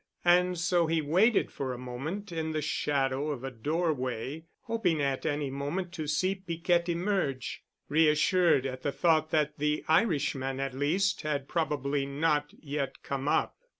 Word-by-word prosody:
And 180 +1 +4
so 175 0 +2
he 165 0 +1
waited 185 +10 +3
for 130 -2 -3
a - - -6
moment 140 +12 -5
in 160 -1 -2
the 155 - -1
shadow 140 -1 0
of 135 -4 -4
a 135 - -4
doorway, 145 0 -2 0.2
hoping 225 -9 0
at 140 -2 -1
any 145 -2 -1
moment 145 +7 -3
to 160 -4 -5
see 185 +6 +1
Piquette 175 -2 0
emerge, 170 -7 -1 0.3
reassured 155 0 +4
at 130 -1 -4
the 145 - -1
thought 155 +2 +2
that 150 -2 0
the 150 +1 0
Irishman 145 -7 +1
at 135 -1 -2
least 170 +9 +1
had 145 -3 -2
probably 145 -4 -1
not 150 +1 0
yet 145 -2 -4
come 140 0 -3
up. - - +1
150 Hz, 155 wpm, -29 LUFS, 140-170 Hz, 0.3 s, And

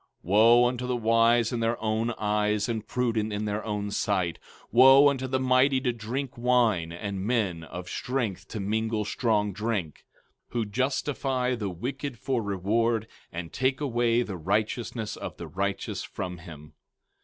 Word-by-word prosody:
15:21 - - -40 0.2
Wo 115 +6 +6
unto 125 0 -3
the 125 - 0
wise 115 +1 +3
in 120 - -1
their 115 +1 0
own 110 +1 0
eyes 105 0 0
and 110 -3 -3
prudent 115 -3 0
in 105 +1 -2
their 105 +1 -2
own 105 -1 -3
sight! 95 -5 0 0.2
15:22 - - -26
Wo 135 +2 +8
unto 130 -2 -2
the 130 0 0
mighty 130 +1 +3
to 125 -2 0
drink 120 +4 -4
wine, 120 -9 +2
and 95 +3 -4
men 100 -7 0
of 90 +2 -8
strength 120 -3 -3
to 110 - -6
mingle 110 +2 -1
strong 105 -2 0
drink; 105 -6 -3 0.4
15:23 - - -28
Who 115 -2 0
justify 130 +2 -1
the 105 -5 -3
wicked 125 - -5
for 125 +1 -1
reward, 110 +3 0 0.3
and 85 -1 -6
take 130 +1 +1
away 120 -4 +1
the 100 -5 -6
righteousness 110 +5 -2
of - - -7
the - - -7
righteous 100 +1 -3
from 90 -1 -6
him! 75 -3 -12
110 Hz, 165 wpm, -27 LUFS, 100-125 Hz, 0.4 s, Wo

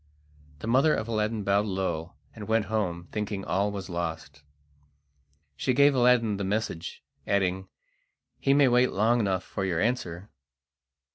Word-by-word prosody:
The - - -5
mother 135 +6 +4
of 110 - -3
Aladdin 110 -1 -1
bowed 100 +2 +2
low 95 -4 -3 0.2
and 105 -2 -9
went 110 -1 +2
home, 85 -5 -2
thinking 105 -2 -3
all 100 +5 0
was 100 -2 -6
lost. 85 -5 -5 1.1
She 130 - 0
gave 140 +1 +5
Aladdin 120 -4 +3
the 100 - -3
message, 95 -4 -3 0.2
adding: 95 -1 0 0.7
"He 135 0 +3
may 140 -1 +5
wait 125 +1 +3
long 115 +4 +2
enough 95 -4 0
for 95 - -5
your 90 -4 -1
answer!" 100 -4 -2
105 Hz, 145 wpm, -27 LUFS, 95-115 Hz, 1.1 s, gave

